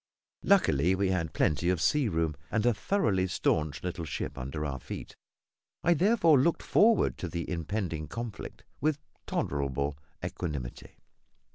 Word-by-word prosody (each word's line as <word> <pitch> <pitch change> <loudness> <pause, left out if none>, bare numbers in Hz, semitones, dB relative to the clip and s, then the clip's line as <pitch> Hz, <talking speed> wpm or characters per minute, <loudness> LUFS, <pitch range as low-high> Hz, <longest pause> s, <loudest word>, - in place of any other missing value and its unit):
Luckily, 90 - +4
we 95 0 +1
had 85 -4 0
plenty 80 +5 +1
of 90 -2 +1
sea 145 - +2
room, 80 -3 0
and 110 +1 0
a 120 - +5
thoroughly 105 - +1
staunch 80 -4 0
little 90 -2 -3
ship 70 -2 -4
under 70 +3 -4
our 70 -3 -3
feet; - - -8 0.7
I 175 - +5
therefore 170 - +4
looked 165 +5 +2
forward 225 +1 +3
to 90 - -3
the 85 0 -4
impending 85 -2 -3
conflict 115 +4 -7 0.2
with 150 0 +1 0.3
tolerable 70 0 -1 0.3
equanimity. 70 -9 -5
90 Hz, 140 wpm, -29 LUFS, 75-120 Hz, 0.7 s, a